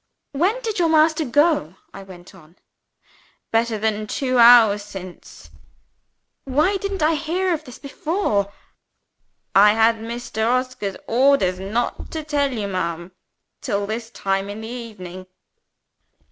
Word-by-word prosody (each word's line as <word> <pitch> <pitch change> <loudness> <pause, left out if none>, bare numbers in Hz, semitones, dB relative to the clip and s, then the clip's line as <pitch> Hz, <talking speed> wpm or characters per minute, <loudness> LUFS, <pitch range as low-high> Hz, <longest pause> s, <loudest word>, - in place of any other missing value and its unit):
"When 365 - 0
did 440 -4 -3
your 335 -2 +2
master 315 0 +3
go?" 290 - +1 0.2
I 195 - -9
went 185 -2 -13
on. 170 -3 -18 1.0
"Better 225 0 +1
than 215 0 -2
two 255 +2 -1
hours 230 -3 +7
since." 190 -3 -11 0.9
"Why 305 +9 +1
didn't 390 -3 -3
I 315 +2 +3
hear 345 +4 -1
of 310 -2 -5
it 245 - -12
before?" 280 - -1 1.0
"I 210 +2 +6
had 225 +1 +3
Mr. 225 0 -5
Oscar's 255 -5 -2
orders 240 -7 +2
not 215 +6 -3
to 315 -1 -4
tell 290 -2 0
you, 215 -5 -3
ma'am, 170 -2 -4 0.5
till 200 0 -2
this 225 +2 -5
time 195 -2 -2
in 205 +2 -7
the 220 - -7
evening." 200 -7 -9
230 Hz, 130 wpm, -21 LUFS, 200-295 Hz, 1.0 s, hours